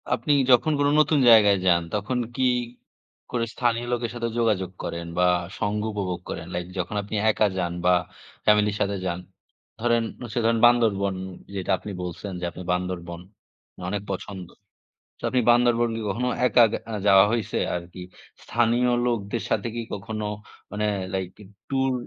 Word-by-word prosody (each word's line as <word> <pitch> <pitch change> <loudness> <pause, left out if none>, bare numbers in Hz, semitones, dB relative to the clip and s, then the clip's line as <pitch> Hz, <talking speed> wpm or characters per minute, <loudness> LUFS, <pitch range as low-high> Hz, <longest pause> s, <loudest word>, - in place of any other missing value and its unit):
আপনি 130 +4 +1 0.2
যখন 125 +5 +5
কোনো 145 0 +3
নতুন 155 -1 +4
জায়গায় 105 -3 +7
যান, 85 -2 +4
তখন 105 +5 -1 0.2
কি 130 - 0 0.9
করে 120 -2 0
স্থানীয় 120 -1 0
লোকের 120 -1 -2
সাথে 115 -1 -2
যোগাযোগ 100 -6 +1
করেন 85 0 -4
বা 90 - +5 0.3
সঙ্গ 105 0 -1
উপভোগ 95 -4 -3
করেন? 85 - -5
লাইক 90 0 -3
যখন 90 +3 -3
আপনি 105 - -6 0.2
একা 105 0 +2
যান 85 -2 -1
বা 90 - +5 0.5
ফ্যামিলির 105 -1 +3
সাথে 100 0 0
যান, 85 -1 -2 0.6
ধরেন 120 0 +2 0.3
সে - - 0
ধরেন 115 0 +3
বান্দরবন 105 -5 +3 0.4
যেটা 95 -2 -2
আপনি 100 +3 -8
বলছেন 90 +3 -6
যে, 90 - -3
আপনি 90 - -9
বান্দরবন 90 -1 -3 0.7
অনেক 105 0 -2
পছন্দ। 95 -1 -6 0.7
তো - - -21
আপনি 125 - +2
বান্দরবন 120 0 +4
কি 115 - -4
কখনো 120 +5 -1 0.2
একা 120 - +6 0.3
আগ 105 - -2
যাওয়া 95 0 +7
হইছে 115 -3 -1 0.2
আরকি? 90 +1 -10 0.4
স্থানীয় 120 +1 +2
লোকদের 115 -2 -1
সাথে 105 +2 0
কি 120 - -2
কখনো 110 +1 -4 0.5
মানে 105 +1 -1 0.3
লাইক 95 -1 -1 0.4
ট্যুর 135 -1 +1
105 Hz, 155 wpm, -25 LUFS, 95-120 Hz, 0.9 s, জায়গায়